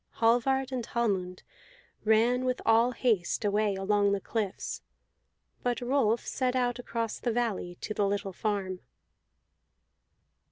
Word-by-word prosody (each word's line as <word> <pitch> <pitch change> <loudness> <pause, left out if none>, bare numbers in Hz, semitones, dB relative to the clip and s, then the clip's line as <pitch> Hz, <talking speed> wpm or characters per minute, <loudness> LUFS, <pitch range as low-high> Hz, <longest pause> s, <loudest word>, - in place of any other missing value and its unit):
Hallvard 255 +3 +2
and 255 -2 -2
Hallmund 195 -7 -1 0.6
ran 230 +4 +3
with 255 -1 0
all 225 +2 +5
haste 220 -5 0
away 205 0 +2
along 200 +1 +2
the 200 - 0
cliffs, 205 -1 -3 0.8
but 245 -1 0
Rolf 245 -3 +1
set 255 -1 -1
out 245 -1 0
across 230 -2 -3
the 240 - -1
valley 220 -7 -1
to 215 - -3
the 205 -1 +1
little 200 -1 -2
farm. 195 -3 -2
225 Hz, 125 wpm, -29 LUFS, 200-245 Hz, 0.8 s, all